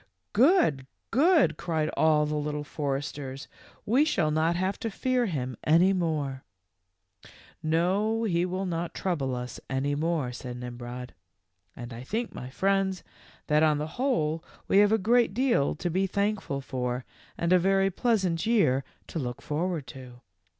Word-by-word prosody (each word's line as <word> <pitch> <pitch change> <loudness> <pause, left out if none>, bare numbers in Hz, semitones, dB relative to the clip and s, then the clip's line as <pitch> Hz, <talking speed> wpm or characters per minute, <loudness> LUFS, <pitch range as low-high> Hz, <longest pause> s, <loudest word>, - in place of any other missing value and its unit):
" - - -52
Good, 215 - +4 0.2
good," 320 +3 +4
cried 160 -3 -1
all 155 -1 +4
the 150 - -3
Little 150 0 -2
Foresters. 140 -2 -4 0.4
w 220 - -2
We 275 +4 +6
shall 175 - +1
not 160 +2 +2
have 185 +2 -1
to 225 - -2
fear 250 +3 0
him 130 - -3
any 170 +5 +5
more." 150 -7 -1 0.8
w - - -17 0.3
No, 190 +8 +1
he 175 -6 +1
will 185 +2 -2
not 170 -1 -3
trouble 140 -9 -1
us 125 0 -6
any 135 +2 0
more," 155 -3 -1
said 125 0 -7
Nimrod; 125 0 -7 0.3
" 90 0 -46
and 120 0 -8
I 115 - -7
think, 225 - -3
my 125 - -7
friends, 195 +4 0 0.4
that 150 0 +3
on 155 -1 +4
the 155 +10 -5
whole 165 - +1 0.2
we 195 - +5
have 205 0 +5
a 220 - +4
great 230 0 +2
deal 240 - +2
to 175 +3 -3
be 190 +3 +1
thankful 200 -7 -1
for 125 -1 -3 0.3
and 170 +1 +2
a 185 - +6
very 195 +1 +2
pleasant 190 -6 +1
year 165 - +3 0.2
to 165 - -5
look 125 -3 -4
forward 160 0 -2
to. 125 -2 -11
160 Hz, 165 wpm, -28 LUFS, 135-195 Hz, 0.8 s, We